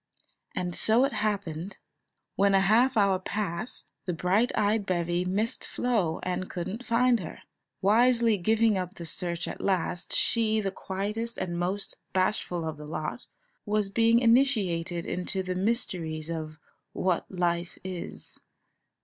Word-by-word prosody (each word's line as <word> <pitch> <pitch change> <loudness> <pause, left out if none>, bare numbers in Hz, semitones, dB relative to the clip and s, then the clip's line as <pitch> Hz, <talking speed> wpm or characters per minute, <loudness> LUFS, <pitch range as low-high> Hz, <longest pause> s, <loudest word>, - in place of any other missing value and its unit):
And 180 -1 -2
so 230 +4 +5
it 275 - -2
happened, 200 -4 -2 0.6
when 200 0 +4
a 195 - +5
half 230 +6 +4
hour 200 -3 +4
passed, 195 +1 -3
and - - -53
the 175 -3 -3
bright 200 +7 +2
eyed 210 +1 +2
bevy 175 -1 0
missed 210 +6 -1
Flo 210 -10 0
and 185 0 -2
couldn't 190 +7 -4
find 240 0 +3
her, 180 - -8 0.4
wisely 230 +1 +4
giving 220 +2 +3
up 180 0 -5
the 170 - -7
search 170 0 -3
at - - -6
last, 180 -2 -1
she, 220 -2 +2
the 195 -2 -1
quietest 210 +5 -3
and 175 -1 -3
most 190 +3 -3 0.2
bashful 185 -3 0
of 160 -1 -4
the 150 0 -9
lot, 155 +8 -4 0.4
was 210 -2 0
being 230 +3 +4
initiated 215 -9 +2
into 190 +1 -2
the 185 0 -2
mysteries 175 -6 -1
of 155 -1 -5 0.4
"what 185 -2 0
life 175 -2 -1
is." 185 -2 -5
190 Hz, 145 wpm, -28 LUFS, 175-220 Hz, 0.6 s, so